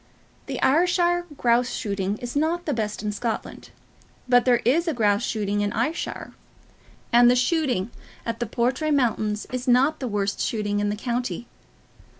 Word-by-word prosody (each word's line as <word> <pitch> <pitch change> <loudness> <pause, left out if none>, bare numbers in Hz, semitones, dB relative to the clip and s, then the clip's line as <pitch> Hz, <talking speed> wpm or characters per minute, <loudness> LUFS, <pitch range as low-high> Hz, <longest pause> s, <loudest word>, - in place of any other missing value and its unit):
The - - -4
Ayrshire 350 +3 +2
grouse 240 +1 +2
shooting 200 -2 -2
is 245 +2 -7
not 330 +4 0
the 295 - 0
best 215 -3 -3
in 210 - -1
Scotland; 220 +2 -4 0.6
but 245 -1 +4
there 245 -2 +3
is 330 +8 +2
grouse 205 -3 +2
shooting 205 -1 -1
in 205 0 0
Ayrshire; 255 +9 -3 0.8
and 240 0 +7
the 250 - +4
shooting 250 - 0 0.3
on 230 - -2
the 240 - -2
Portray 255 +7 0
mountains 220 -7 0
is 255 +1 -4
not 265 +5 +3
the 255 - -3
worst 200 -2 -1
shooting 205 -2 -1
in 205 0 0
the 205 - -1
county. 240 +2 -3
240 Hz, 155 wpm, -24 LUFS, 210-275 Hz, 0.8 s, and